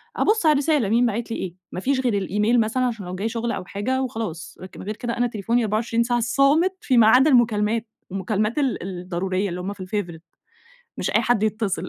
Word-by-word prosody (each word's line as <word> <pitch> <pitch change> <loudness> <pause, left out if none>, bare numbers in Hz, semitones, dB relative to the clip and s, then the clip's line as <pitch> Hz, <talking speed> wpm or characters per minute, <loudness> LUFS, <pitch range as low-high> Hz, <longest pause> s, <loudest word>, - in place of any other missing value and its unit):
أبص 435 -4 +2
على 305 - +6
الرسالة 285 -6 +1
مين 240 +2 +3
باعِت 230 +1 -2
لي - - -2
إيه 180 -2 -5 0.2
ما - - -4
فيش 265 +5 0
غير 245 -4 0
الإيميل 210 +4 +1
مثلًا 245 +4 +1
عشان 225 -6 -3
لو 180 +1 -5
جاي 210 +4 -2
شغل 230 +1 -2
أو 180 - -4
حاجة 255 +8 -2
وخلاص، 175 -10 -5 0.2
غير 210 +2 -5
كده 235 0 -4
أنا 245 0 +2
تليفوني 230 +2 0
24 230 +2 0
ساعة 240 0 0
صامت 280 +9 +2
في 255 -3 +1
ما 220 -2 +7
عدا 260 +6 +6
المكالمات، 225 -2 +2 0.2
المكالمات 210 +5 -1
ال 270 -10 0
الضرورية 185 +1 -3
اللي 180 +1 -5
هُم 200 +2 -4
في 190 - -9
الfavourite 175 -5 -4 0.8
مش - - -2
أي - - +2
حد 240 -4 +1
يتصل. 215 -2 -1
225 Hz, 205 wpm, -23 LUFS, 195-245 Hz, 0.8 s, ما